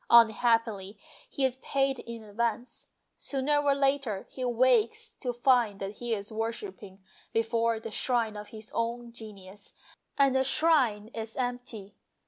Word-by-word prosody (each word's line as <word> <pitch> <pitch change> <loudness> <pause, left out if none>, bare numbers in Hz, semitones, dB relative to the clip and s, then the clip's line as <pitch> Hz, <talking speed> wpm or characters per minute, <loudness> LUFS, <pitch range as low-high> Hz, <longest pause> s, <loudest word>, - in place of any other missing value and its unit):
Unhappily 225 -3 +4 0.3
he 275 - 0
is 260 -1 -1
paid 270 0 0
in 235 -1 -8
advance; 230 +3 -3 0.3
sooner 280 +2 0
or 285 -1 +3
later 275 -7 0
he 255 - -6
wakes 245 -2 +2
to 250 - -3
find 240 -4 +2
that 195 +1 -5
he 240 -1 -5
is 205 +1 -7
worshipping 225 - -5 0.3
before 230 0 +1
the 225 0 -7
shrine 230 -1 0
of 210 0 -7
his 215 0 -9
own 235 +1 -2
genius, 205 -3 -12 0.4
and 275 -2 +4
the 265 - +4
shrine 260 -8 +3
is 225 -1 -6
empty. 245 -5 -4
230 Hz, 140 wpm, -29 LUFS, 215-255 Hz, 0.4 s, Unhappily